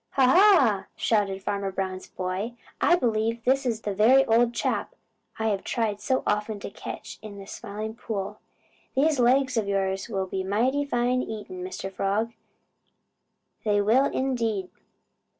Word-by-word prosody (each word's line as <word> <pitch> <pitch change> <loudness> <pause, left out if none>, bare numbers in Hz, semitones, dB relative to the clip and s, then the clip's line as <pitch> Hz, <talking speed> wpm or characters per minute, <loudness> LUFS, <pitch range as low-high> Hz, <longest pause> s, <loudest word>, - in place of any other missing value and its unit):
"Ha, 270 -1 +4
ha!" 270 - +5
shouted 195 -3 0
Farmer 200 -1 -2
Brown's 190 -1 -4
boy, 185 +6 -3 0.3
"I 350 - +5
believe 230 -4 0
this 265 +1 +2
is 225 -2 -1
the 205 - -2
very 250 +7 +5
old 235 0 +3
chap - - -2 0.4
I 220 0 0
have 200 -2 -1
tried 215 -3 -1
so 260 +5 0
often 210 0 -1
to - - -6
catch - - -8
in 210 -2 -9
the 195 - -9
Smiling 215 +2 -6
Pool. 210 -3 -5 0.6
These 290 +1 +3
legs 255 +1 +3
of 215 -3 +1
yours 195 0 -1
will 195 -3 -1
be 190 0 -3
mighty 245 +9 +1
fine 250 -1 +1
eating, 205 -6 -6
Mr. 185 +1 -6
Frog. 210 +5 -1 1.3
They 205 -2 +2
will, 225 +7 +4
indeed." 230 -9 -1
220 Hz, 150 wpm, -26 LUFS, 200-245 Hz, 1.3 s, ha